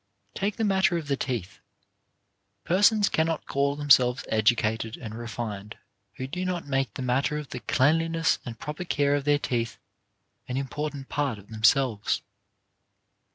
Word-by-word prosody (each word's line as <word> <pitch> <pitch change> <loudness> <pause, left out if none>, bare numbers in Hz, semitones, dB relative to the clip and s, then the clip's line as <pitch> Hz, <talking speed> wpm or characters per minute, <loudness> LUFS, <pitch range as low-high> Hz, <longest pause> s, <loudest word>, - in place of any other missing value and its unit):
Take 200 +1 -1
the 225 - -2
matter 190 -3 +3
of 160 -3 -5
the 140 - +1
teeth. 115 -10 -4 1.0
Persons 205 - +4
cannot 160 0 0
call 140 +1 0
themselves 135 -4 +4
educated 110 0 +1
and 110 -4 -7
refined 110 -3 -6 0.4
who 130 - -4
do 180 +8 -4
not 180 -2 -2
make 135 -6 -1
the 130 - -4
matter 130 +4 +1
of 150 -2 -6
the - - -5
cleanliness 165 +4 +2
and 115 -2 -7
proper 150 +9 -5
care 145 -5 +1
of 145 -1 0
their 145 0 +4
teeth 115 -4 -2 0.7
an 125 - -3
important 140 +1 -4
part 140 -6 -1
of 100 +1 -15
themselves. 110 +1 +2
135 Hz, 150 wpm, -27 LUFS, 115-155 Hz, 1.0 s, Persons